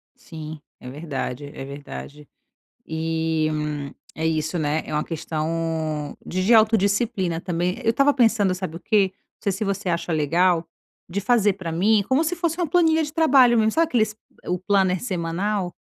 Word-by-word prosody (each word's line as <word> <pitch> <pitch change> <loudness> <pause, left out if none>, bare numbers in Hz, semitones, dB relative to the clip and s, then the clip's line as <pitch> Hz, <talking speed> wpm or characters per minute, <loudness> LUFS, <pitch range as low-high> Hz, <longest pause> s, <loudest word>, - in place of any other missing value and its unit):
Sim, 155 -1 -9 0.2
é 125 - -9
verdade, 145 -2 -5
é 135 - -7
verdade. 140 +1 -9 0.6
E, 160 0 -1 0.7
é 160 - -3
isso, 155 +1 0
né. 155 +1 0
É - - -6
uma 150 0 +1
questão 160 -2 -3
de 185 +1 -2
de 235 - +5
autodisciplina 205 -4 +2
também. 175 +1 -1
Eu - - +2
estava 275 +4 +3
pensando, 225 -7 +3
sabe 185 -3 -5
o - - -13
quê? 200 -1 +2
Não - - -48
sei 200 - +1
se 195 +3 -3
você 200 -1 -2
acha 170 0 -1
legal, 165 +3 +2 0.4
de 200 +3 -2
fazer 210 -2 +3
para 185 -4 -6
mim, 200 +5 +3
como 265 +4 +3
se 330 +2 -1
fosse 340 -1 -1
uma 350 - +1
planilha 320 0 +3
de 295 -1 -5
trabalho 270 -7 +5
mesmo. 220 0 +3
Sabe, 330 +7 +2
o - - -15
aqueles 220 -6 +1 0.3
o 180 0 -1
planner 190 -1 +2
semanal? 185 -1 -2
185 Hz, 175 wpm, -23 LUFS, 160-220 Hz, 0.7 s, de